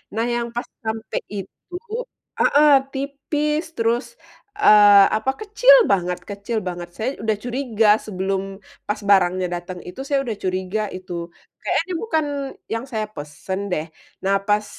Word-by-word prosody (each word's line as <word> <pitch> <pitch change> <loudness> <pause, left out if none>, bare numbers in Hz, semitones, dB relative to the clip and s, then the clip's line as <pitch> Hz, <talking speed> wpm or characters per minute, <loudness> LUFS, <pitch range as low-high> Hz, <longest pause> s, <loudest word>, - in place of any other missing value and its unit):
Nah, 225 - +1
yang 235 0 -1
pas 240 - -1 0.2
sampe 220 0 -3 0.2
itu 200 - -9 0.6
heeh, 300 +1 +5 0.3
tipis, 295 +3 -1
terus, 235 +1 +1 0.5
eee, 205 - +8
apa 220 +5 +1
kecil 440 +4 +6 0.2
banget 180 -2 +1
kecil 200 +3 -4
banget. 175 -1 -4
Saya 225 +4 -1
udah 220 -1 +1
curiga 240 -3 0 0.2
sebelum 190 -1 -2 0.5
pas 210 +1 -1
barangnya 185 -2 +4
dateng 175 +1 -5
itu, 180 - -9
saya 280 -1 +2
udah 230 -5 -3
curiga 185 +3 -1
itu, 185 0 -8 0.5
kayaknya - - +1
ini 370 - -5
bukan 320 -9 0 0.5
yang 225 +3 -3
saya 215 -2 -1
pesen 150 +6 -5
deh. 155 -3 -1 0.4
Nah, 195 +1 +2
pas 210 0 +2
215 Hz, 140 wpm, -22 LUFS, 190-260 Hz, 0.6 s, eee